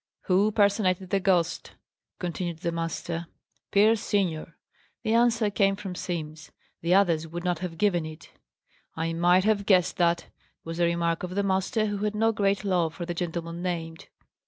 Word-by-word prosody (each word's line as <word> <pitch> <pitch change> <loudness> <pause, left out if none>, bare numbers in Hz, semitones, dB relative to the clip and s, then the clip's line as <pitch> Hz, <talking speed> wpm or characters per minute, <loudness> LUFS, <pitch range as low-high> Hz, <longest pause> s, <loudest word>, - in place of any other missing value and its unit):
"Who 195 +3 +2
personated 200 -3 +2
the 195 - +3
ghost?" 175 -3 0 0.4
continued 175 -1 -3
the 170 -3 -1
master. 165 0 -4 0.4
"Pierce 215 +2 +4
senior." 170 -5 -1 0.5
The 220 -1 +1
answer 230 -2 +3
came 195 -1 +2
from 195 -2 -6
Simms. 155 -4 -5 0.3
The 170 +2 +3
others 170 -5 +3
would 170 +2 -6
not 175 -2 0
have 175 -2 -5
given 175 -4 +1
it. 155 0 -11 0.6
"I 165 +1 -2
might 175 +2 +4
have 205 -1 +1
guessed 185 -3 +3
that," 170 -1 +2 0.4
was 165 0 -6
the 175 - +3
remark 170 -1 0
of 180 0 -5
the 200 - +1
master, 195 +3 +1
who 205 -1 -2
had 210 +1 -2
no 225 +1 +3
great 200 -2 0
love 175 -5 0
for 175 - -5
the 175 - -3
gentleman 170 0 -4
named. 165 -3 -4
180 Hz, 170 wpm, -27 LUFS, 170-200 Hz, 0.6 s, Pierce